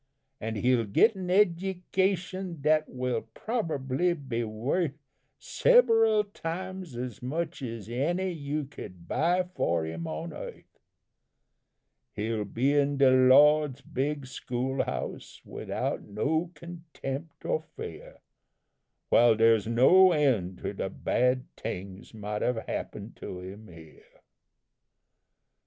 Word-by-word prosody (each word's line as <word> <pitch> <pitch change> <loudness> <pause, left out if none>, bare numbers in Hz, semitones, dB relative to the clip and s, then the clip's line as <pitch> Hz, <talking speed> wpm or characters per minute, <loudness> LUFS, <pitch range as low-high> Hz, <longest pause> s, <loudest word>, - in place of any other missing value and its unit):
An' 110 0 -4
he'll 120 +2 +2
get 200 - +4
an' 185 -2 -5
education 185 -1 0
dat 155 +2 +3
will 125 -2 -2
proberbly 170 - -1
be 130 -7 -3
worth 135 +8 -1 0.4
Seberal 225 - +4
times 180 -3 -5
as 125 +1 -5
much 155 +5 -3
as 115 -5 -6
any 170 +11 -1
you 150 -2 -3
could 90 -10 -11
buy 175 +6 +2
for 85 - -1
him 80 +1 -5
on 80 -1 -5
earth; - - -10 1.4
He'll 110 0 -2
be 130 +7 +1
in 145 -1 +2
de 135 -1 +6
Lawd's 135 +2 +5
big 140 +1 -2
schoolhouse, 130 0 -4
widout - - -3
no 155 +12 -1
contempt 160 -3 -7
or - - 0
fear; - - -9 0.9
While 120 -1 +6
dere's 115 -1 +4
no 175 +11 +6
end 115 - +1
to - - -2
the - - -3
bad 125 +1 0
tings 95 -3 -7
might 105 -1 -5
have 120 -2 -1
happened - - -6
to 90 - -7
him 100 +4 -9
here. 80 -3 -16
135 Hz, 115 wpm, -28 LUFS, 115-175 Hz, 1.4 s, de